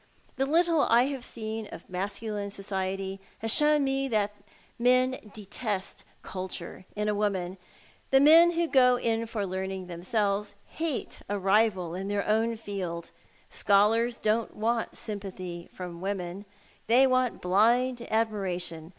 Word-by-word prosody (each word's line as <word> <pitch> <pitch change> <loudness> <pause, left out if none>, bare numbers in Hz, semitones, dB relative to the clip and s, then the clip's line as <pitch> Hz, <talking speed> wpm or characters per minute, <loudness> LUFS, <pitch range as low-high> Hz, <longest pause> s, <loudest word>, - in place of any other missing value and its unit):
The 270 +1 0
little 330 +1 +3
I 235 +2 +6
have 270 -3 -5
seen 220 -2 -5
of - - -10
masculine 200 +2 -4
society 195 -1 -4 0.2
has 225 0 0
shown 300 -1 +4
me 270 0 0
that 210 -4 0 0.5
men 255 +2 +3
detest 205 -1 -4
" - - -35
culture 185 -1 -6
" - - -29
in 210 0 -1
a 210 - +2
woman. 195 -3 -1 0.5
The 270 - +6
men 330 +4 +7
who 340 0 +1
go 250 -4 +5
in 230 -1 -1
for 215 -3 -2
learning 190 0 -4
themselves 200 +3 -1
hate 315 -4 -3
a 205 - 0
rival 195 -3 +2
in 190 +2 -4
their 200 0 -1
own 225 +2 +2
field. 190 -6 -5 0.4
Scholars 225 +4 +3
don't 220 +1 0
want 230 +2 -1
sympathy 185 -5 -6
from 175 -2 -8
women. 195 0 -4 0.4
They 250 +4 +6
want 255 -2 +1
blind 235 +7 +3
admiration. 185 -7 -1
210 Hz, 140 wpm, -28 LUFS, 190-240 Hz, 0.5 s, men